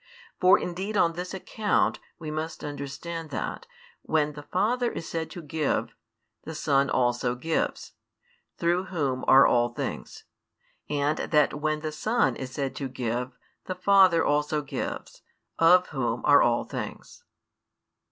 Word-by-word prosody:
For 185 Hz, +1 st, +6 dB
indeed 190 Hz, +4 st, -3 dB
on 165 Hz, -3 st, +3 dB
this 180 Hz, +2 st, -5 dB
account 205 Hz, +2 st, 0 dB, 0.2 s
[we 155 Hz, -3 st, -6 dB
must 155 Hz, +1 st, -5 dB
understand 150 Hz, +3 st, -6 dB
that] -, -, -5 dB, 0.3 s
when 150 Hz, -1 st, 0 dB
the 145 Hz, -, -8 dB
Father 235 Hz, +10 st, 0 dB
is 165 Hz, -, -6 dB
said 165 Hz, -1 st, -3 dB
to 175 Hz, -, -9 dB
give, 150 Hz, -1 st, -1 dB, 0.5 s
the 160 Hz, +1 st, -7 dB
Son 140 Hz, -2 st, +2 dB
also 120 Hz, 0 st, +1 dB
gives, 160 Hz, +6 st, -2 dB, 0.7 s
through 175 Hz, +2 st, +1 dB
Whom 140 Hz, -7 st, -2 dB
are 135 Hz, +1 st, +8 dB
all 120 Hz, 0 st, +3 dB
things; -, -, -5 dB, 0.7 s
and 145 Hz, +1 st, 0 dB
that 150 Hz, -3 st, +2 dB
when 155 Hz, 0 st, 0 dB
the 155 Hz, 0 st, -3 dB
Son 220 Hz, +10 st, +1 dB
is 130 Hz, -, -6 dB
said 135 Hz, 0 st, -3 dB
to 135 Hz, -, -3 dB
give, 125 Hz, 0 st, -3 dB, 0.3 s
the 185 Hz, -, -4 dB
Father 185 Hz, -3 st, +5 dB
also 150 Hz, +1 st, +1 dB
gives, 140 Hz, -, -5 dB, 0.4 s
of 180 Hz, +2 st, +5 dB
Whom 120 Hz, -5 st, -2 dB
are 145 Hz, -1 st, +7 dB
all 120 Hz, 0 st, +2 dB
things. -, -, -7 dB
155 Hz, 140 wpm, -27 LUFS, 135-175 Hz, 0.7 s, are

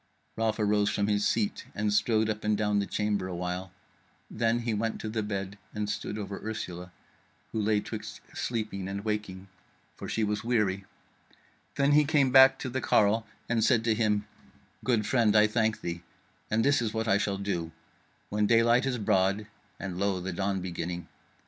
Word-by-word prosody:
Ralph 110 Hz, -1 st, 0 dB
arose 105 Hz, -1 st, +2 dB
from 100 Hz, -, 0 dB
his 105 Hz, 0 st, +2 dB
seat 110 Hz, -3 st, -1 dB
and 105 Hz, 0 st, 0 dB
strode 110 Hz, +1 st, +2 dB
up 110 Hz, 0 st, -3 dB
and 105 Hz, -1 st, +1 dB
down 105 Hz, -1 st, +1 dB
the 100 Hz, -, -1 dB
chamber 105 Hz, -3 st, -1 dB
a 90 Hz, -, -5 dB
while; 90 Hz, +1 st, -4 dB, 0.6 s
then 115 Hz, +1 st, +1 dB
he 115 Hz, -1 st, -1 dB
went 110 Hz, +1 st, -1 dB
to 110 Hz, -, -4 dB
bed, 100 Hz, -1 st, -4 dB, 0.2 s
and 105 Hz, 0 st, -2 dB
stood 105 Hz, 0 st, -3 dB
over 100 Hz, -2 st, -5 dB
Ursula, 90 Hz, -5 st, -5 dB, 0.6 s
who 110 Hz, -, -1 dB
lay 105 Hz, 0 st, +2 dB
twixt 105 Hz, 0 st, -7 dB
sleeping 110 Hz, -5 st, -3 dB
and 100 Hz, +2 st, -5 dB
waking, 105 Hz, -3 st, -3 dB, 0.5 s
for -, -, -7 dB
she 110 Hz, -, 0 dB
was 105 Hz, 0 st, -1 dB
weary; 105 Hz, -5 st, 0 dB, 0.9 s
then 140 Hz, 0 st, +3 dB
he 150 Hz, +1 st, +6 dB
came 145 Hz, -3 st, +2 dB
back 135 Hz, 0 st, +8 dB
to 130 Hz, -, -4 dB
the 130 Hz, +1 st, -2 dB
carle, 110 Hz, +1 st, +3 dB, 0.2 s
and 115 Hz, -2 st, +1 dB
said 115 Hz, 0 st, +3 dB
to 115 Hz, -1 st, +2 dB
him: 105 Hz, -2 st, +1 dB, 0.6 s
"Good 115 Hz, -4 st, +1 dB
friend, 115 Hz, -3 st, +3 dB
I 105 Hz, 0 st, +7 dB
thank 110 Hz, 0 st, 0 dB
thee, 85 Hz, 0 st, -4 dB, 0.5 s
and 110 Hz, +1 st, +2 dB
this 140 Hz, -1 st, +4 dB
is 110 Hz, -1 st, -2 dB
what 110 Hz, +1 st, -1 dB
I 100 Hz, -2 st, +3 dB
shall 100 Hz, -1 st, -1 dB
do: 90 Hz, -5 st, -3 dB, 0.6 s
when 105 Hz, 0 st, +1 dB
daylight 115 Hz, +3 st, +4 dB
is 125 Hz, -2 st, 0 dB
broad 100 Hz, 0 st, +1 dB, 0.3 s
(and 90 Hz, -1 st, -5 dB
lo, 100 Hz, -1 st, +1 dB
the 90 Hz, +1 st, -4 dB
dawn 95 Hz, +1 st, -1 dB
beginning!) 90 Hz, -1 st, -5 dB
105 Hz, 180 wpm, -29 LUFS, 100-115 Hz, 0.9 s, back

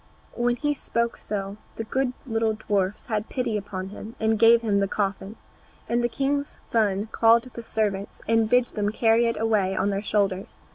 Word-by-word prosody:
When 240 Hz, 0 st, +1 dB
he 295 Hz, +4 st, 0 dB
so 235 Hz, -4 st, -1 dB
spoke -, -, -20 dB, 0.6 s
the 225 Hz, -, -3 dB
good 255 Hz, +3 st, -1 dB
little 225 Hz, -2 st, 0 dB
dwarfs 205 Hz, -2 st, -1 dB
had 215 Hz, -2 st, -2 dB
pity 245 Hz, -4 st, -1 dB
upon 190 Hz, -2 st, -4 dB
him 215 Hz, +3 st, -9 dB
and 220 Hz, -1 st, +1 dB
gave 230 Hz, +1 st, +6 dB
him 205 Hz, -3 st, +2 dB
the 195 Hz, -, +1 dB
coffin, 200 Hz, +1 st, -2 dB, 0.5 s
and 240 Hz, +1 st, +1 dB
the 240 Hz, -, +2 dB
king's 280 Hz, +3 st, -1 dB
son 210 Hz, -2 st, +1 dB
called 230 Hz, +1 st, +4 dB
his 235 Hz, -2 st, -10 dB
servants 205 Hz, -2 st, -2 dB
and 225 Hz, -1 st, +3 dB
bid 245 Hz, 0 st, +3 dB
them 205 Hz, -1 st, -1 dB
carry 225 Hz, +1 st, +3 dB
it 230 Hz, -, -1 dB
away 210 Hz, -4 st, +1 dB
on 200 Hz, +2 st, +1 dB
their 195 Hz, 0 st, -1 dB
shoulders. 200 Hz, -2 st, -1 dB
220 Hz, 185 wpm, -25 LUFS, 205-235 Hz, 0.6 s, gave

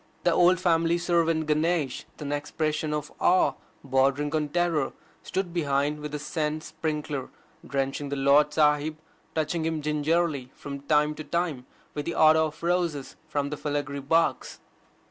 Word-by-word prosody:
The 175 Hz, -, +4 dB
old 180 Hz, +1 st, +5 dB
family 170 Hz, -1 st, +2 dB
servant 165 Hz, -2 st, +1 dB
Ganesh, 155 Hz, -2 st, 0 dB
with -, -, -10 dB
an 145 Hz, -, -4 dB
expression 155 Hz, +1 st, -1 dB
of 150 Hz, -1 st, -3 dB
awe 180 Hz, -6 st, +4 dB, 0.3 s
bordering 140 Hz, +2 st, +1 dB
on 150 Hz, -1 st, 0 dB
terror, 170 Hz, -3 st, 0 dB, 0.3 s
stood 185 Hz, -2 st, -3 dB
behind 145 Hz, -2 st, 0 dB
with 150 Hz, 0 st, -6 dB
the 150 Hz, -, -3 dB
scent 150 Hz, +1 st, -2 dB
sprinkler, 150 Hz, -4 st, -4 dB, 0.4 s
drenching 140 Hz, +1 st, -2 dB
the 140 Hz, -, -2 dB
Lord 140 Hz, +2 st, +4 dB
Sahib, 150 Hz, 0 st, +2 dB, 0.4 s
touching 160 Hz, +1 st, 0 dB
him 160 Hz, -1 st, -1 dB
gingerly 150 Hz, -2 st, 0 dB
from 140 Hz, -1 st, -7 dB
time 150 Hz, +1 st, +2 dB
to 155 Hz, -, -7 dB
time 150 Hz, -4 st, -2 dB, 0.3 s
with 145 Hz, -1 st, -4 dB
the 170 Hz, -, -3 dB
otto 160 Hz, 0 st, +5 dB
of 155 Hz, -, -12 dB
roses 170 Hz, -5 st, -1 dB
from 145 Hz, -2 st, -2 dB
the 150 Hz, -, -3 dB
filigree 145 Hz, -1 st, -3 dB
box. 165 Hz, +5 st, 0 dB
150 Hz, 155 wpm, -27 LUFS, 145-165 Hz, 0.4 s, old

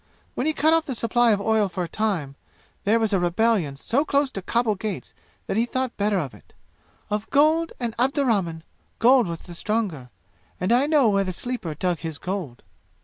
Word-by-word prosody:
When 265 Hz, -, -1 dB
he 315 Hz, -, +2 dB
cut 315 Hz, +2 st, +3 dB
off 325 Hz, -1 st, +2 dB
the 265 Hz, -, -3 dB
supply 235 Hz, +1 st, +2 dB
of 205 Hz, -, +2 dB
oil 215 Hz, -1 st, +2 dB
for 185 Hz, 0 st, -3 dB
a -, -, -4 dB
time, 170 Hz, -8 st, -2 dB, 0.5 s
there 215 Hz, +3 st, +4 dB
was 220 Hz, -2 st, 0 dB
a 195 Hz, -, +3 dB
rebellion 175 Hz, -3 st, +1 dB
so 235 Hz, -, 0 dB
close 280 Hz, -2 st, +1 dB
to 195 Hz, -, -5 dB
Khabul 230 Hz, +3 st, +1 dB
gates 205 Hz, -1 st, -5 dB, 0.3 s
that -, -, -2 dB
he 230 Hz, +2 st, +2 dB
thought 255 Hz, -1 st, -2 dB
better 205 Hz, 0 st, +1 dB
of 145 Hz, -8 st, -3 dB
it. -, -, -18 dB, 0.6 s
Of 210 Hz, +1 st, -2 dB
gold 315 Hz, +3 st, +3 dB
and 235 Hz, -3 st, -2 dB
Abdurrahman, 230 Hz, -, +1 dB, 0.3 s
gold 245 Hz, -1 st, +5 dB
was 170 Hz, -1 st, -5 dB
the 175 Hz, -, -11 dB
stronger. 180 Hz, -, -2 dB, 0.5 s
And 185 Hz, +4 st, 0 dB
I 255 Hz, +4 st, +4 dB
know 295 Hz, -5 st, +4 dB
where 200 Hz, -2 st, +3 dB
the 185 Hz, -, -3 dB
Sleeper 185 Hz, -5 st, -4 dB
dug 175 Hz, +1 st, -1 dB
his 160 Hz, 0 st, -5 dB
gold!" 180 Hz, -8 st, -5 dB
215 Hz, 200 wpm, -24 LUFS, 180-250 Hz, 0.6 s, gold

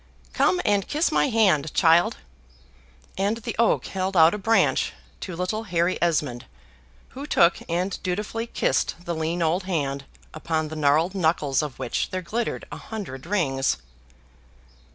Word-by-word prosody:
"Come 360 Hz, -, +2 dB
and 200 Hz, -2 st, +2 dB
kiss 310 Hz, +3 st, +1 dB
my 285 Hz, -, +2 dB
hand, 190 Hz, -, +2 dB
child;" 170 Hz, 0 st, +4 dB, 1.0 s
and 205 Hz, +3 st, +1 dB
the 230 Hz, -, -5 dB
oak 230 Hz, -, +3 dB
held 190 Hz, 0 st, -2 dB
out 160 Hz, 0 st, +7 dB
a 210 Hz, -, -3 dB
BRANCH 225 Hz, +3 st, +2 dB, 0.3 s
to 185 Hz, -, -6 dB
little 185 Hz, +6 st, -2 dB
Harry 175 Hz, -1 st, 0 dB
Esmond, 150 Hz, -8 st, 0 dB, 0.6 s
who 275 Hz, +3 st, -8 dB
took 170 Hz, -10 st, +4 dB
and 180 Hz, +3 st, -2 dB
dutifully 210 Hz, +5 st, -3 dB
kissed -, -, 0 dB
the 170 Hz, -, -2 dB
lean 165 Hz, +2 st, -1 dB
old 175 Hz, +4 st, 0 dB
hand, 140 Hz, -6 st, -2 dB, 0.3 s
upon 155 Hz, -1 st, -2 dB
the 160 Hz, -, -6 dB
gnarled 155 Hz, +4 st, +2 dB
knuckles 160 Hz, -7 st, +1 dB
of 150 Hz, -4 st, -5 dB
which 130 Hz, -2 st, -2 dB
there 185 Hz, 0 st, -4 dB
glittered 225 Hz, +6 st, -3 dB
a -, -, -6 dB
hundred 175 Hz, -, -7 dB
rings. 140 Hz, -10 st, +1 dB
175 Hz, 150 wpm, -24 LUFS, 155-205 Hz, 1.0 s, out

